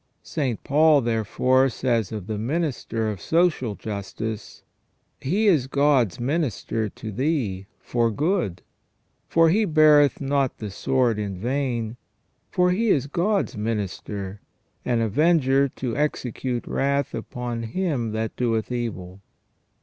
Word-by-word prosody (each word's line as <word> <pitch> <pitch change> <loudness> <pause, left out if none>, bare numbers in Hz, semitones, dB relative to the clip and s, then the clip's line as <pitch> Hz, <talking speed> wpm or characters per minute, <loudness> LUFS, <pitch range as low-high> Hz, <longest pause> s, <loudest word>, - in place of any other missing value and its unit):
St. 130 -7 -2
Paul, 150 0 +5
therefore, 125 +3 +2
says 120 -4 -1
of 105 -4 -5
the 105 0 -4
minister 125 -4 -2
of 105 -3 -4
social 160 - +1
justice: 105 +1 -6 0.3
" - - -47 0.3
He 195 +11 +1
is 155 -11 +4
God's 140 - +2
minister 120 - -1
to 110 +2 -8
thee, 115 - -1
for 120 -1 0
good: 145 - -1 0.6
for 165 0 +4
he 210 +7 +3
beareth 155 -5 +5
not 140 -1 0
the 105 -3 -6
sword 120 +1 +1
in 100 -3 -3
vain, 120 0 -2 0.5
for 180 0 +2
he 220 +5 +1
is 140 -8 +3
God's 185 +8 0
minister, 105 -2 -4 0.4
an 120 -2 +1
avenger 140 - +3
to 125 -2 -4
execute 130 -4 -2
wrath 140 0 0
upon 120 -1 -4
him 125 - -2
that 110 +1 -3
doeth 115 -2 -1
evil 100 -6 -4
125 Hz, 125 wpm, -24 LUFS, 110-150 Hz, 0.6 s, Paul